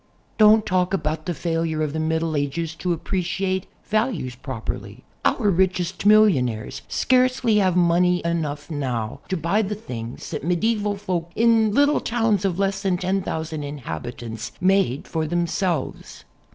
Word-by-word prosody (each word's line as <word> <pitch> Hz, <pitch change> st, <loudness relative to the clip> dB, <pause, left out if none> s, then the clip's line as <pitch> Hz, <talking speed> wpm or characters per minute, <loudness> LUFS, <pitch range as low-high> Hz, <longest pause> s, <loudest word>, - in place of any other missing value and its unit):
Don't 215 Hz, 0 st, +6 dB
talk 185 Hz, 0 st, +1 dB
about 155 Hz, -2 st, -3 dB
the 175 Hz, -, 0 dB
failure 165 Hz, -2 st, -1 dB
of 150 Hz, -1 st, -2 dB
the 160 Hz, -, -2 dB
Middle 160 Hz, 0 st, 0 dB
Ages 150 Hz, +3 st, -2 dB
to 175 Hz, +2 st, -3 dB
ap 165 Hz, -, -3 dB
preciate 190 Hz, +1 st, -1 dB, 0.2 s
values 215 Hz, -, -1 dB
properly. 130 Hz, -3 st, -6 dB, 0.2 s
Our 205 Hz, -, +2 dB
richest 185 Hz, +1 st, 0 dB
millionaires 140 Hz, -, +3 dB
scarcely 255 Hz, -3 st, +2 dB
have 185 Hz, -3 st, +3 dB
money 180 Hz, 0 st, +3 dB
enough 150 Hz, -3 st, -2 dB
now 130 Hz, -3 st, -3 dB
to 190 Hz, -, 0 dB
buy 170 Hz, +7 st, +1 dB
the 210 Hz, 0 st, -2 dB
things 120 Hz, -, -7 dB
that -, -, -4 dB
medieval 205 Hz, +4 st, 0 dB
folk 180 Hz, -4 st, -3 dB
in 225 Hz, -2 st, +4 dB
little 285 Hz, +5 st, +3 dB
towns 225 Hz, -4 st, +1 dB
of 180 Hz, -3 st, 0 dB
less 195 Hz, 0 st, 0 dB
than 190 Hz, -3 st, +1 dB
10,000 170 Hz, -4 st, -2 dB
inhabitants 120 Hz, -, -6 dB
made 185 Hz, -8 st, +2 dB
for 160 Hz, -1 st, -2 dB
themselves. 175 Hz, -1 st, -2 dB
175 Hz, 145 wpm, -23 LUFS, 155-200 Hz, 0.2 s, Don't